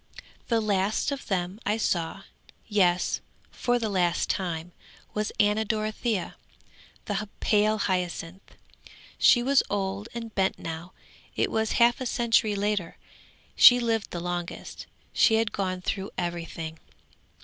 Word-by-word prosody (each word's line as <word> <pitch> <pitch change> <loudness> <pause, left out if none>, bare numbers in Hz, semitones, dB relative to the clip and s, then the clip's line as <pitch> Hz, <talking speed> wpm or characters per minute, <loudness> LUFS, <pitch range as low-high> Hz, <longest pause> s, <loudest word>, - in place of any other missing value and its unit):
'The 230 -1 +2
last 205 +4 0
of 280 -1 -5
them 185 +1 -2
I 210 +2 0
saw, 180 -2 -1 0.4
yes, 185 -4 +2 0.3
for 245 0 0
the 230 -2 -1
last 180 -4 +1
time, 175 -3 -3 0.4
was 210 0 -1
Anna 210 +1 +3
Dorothea, 215 -1 -2 0.7
the 210 0 -3
pale 215 0 +3
hyacinth. 180 -2 -3 0.6
She 240 - +6
was 275 +2 +4
old 200 +1 -2
and 230 -2 -6
bent 190 -1 +1
now; 165 +2 -7 0.4
it - - 0
was 220 -1 0
half 240 +2 +4
a 255 - -1
century 225 -3 +2
later. 200 -4 -1 0.6
She 245 0 +9
lived 225 -3 0
the 175 - -5
longest, 175 0 -5 0.3
she 225 - +5
had 225 -1 +1
gone 185 -2 -2
through 195 +2 -3
everything. 165 -2 -4
205 Hz, 130 wpm, -27 LUFS, 180-220 Hz, 0.7 s, She